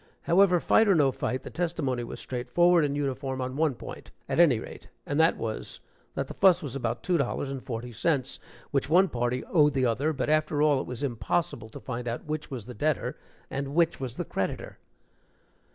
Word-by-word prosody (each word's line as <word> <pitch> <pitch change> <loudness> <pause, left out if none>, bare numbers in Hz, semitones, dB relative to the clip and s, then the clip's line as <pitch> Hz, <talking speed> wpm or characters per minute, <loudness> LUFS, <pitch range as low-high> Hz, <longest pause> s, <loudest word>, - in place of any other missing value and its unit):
However, 180 0 +4
fight 220 +6 +4
or 195 - +5
no 145 -4 +4
fight, 130 0 -3
the - - -8
testimony 160 -8 -1
was 115 - -7
straightforward 165 +8 +2
and 145 -1 0
uniform 135 -1 -2
on 130 0 -3
one 150 -3 +1
point, - - -9 0.2
at - - -1
any 155 -9 +6
rate, - - -10 0.2
and 145 - -1
that 160 +1 +4
was, 110 -1 -4 0.4
that - - -2
the - - -7
fuss 185 -2 +4
was 140 -3 -5
about 120 -3 -2
two 175 -3 +1
dollars 135 +1 -1
and 135 -2 -5
forty 120 0 -5
cents, 135 +2 0 0.3
which 140 -1 0
one 185 +4 +5
party 120 +1 -1
owed 150 -4 +3
the 130 -1 +2
other, 125 +7 +1
but 135 -4 -2
after 155 -1 +1
all, 145 -3 +4
it - - -7
was 125 +3 -5
impossible 120 -1 -1
to - - -9
find 120 -1 -5
out 120 +1 -4
which 155 0 -4
was 125 -6 -6
the 125 - -8
debtor 150 +2 -1 0.4
and 140 +1 -3
which 170 0 +3
the 130 -3 -4
creditor. - - -4
140 Hz, 200 wpm, -28 LUFS, 125-160 Hz, 0.4 s, any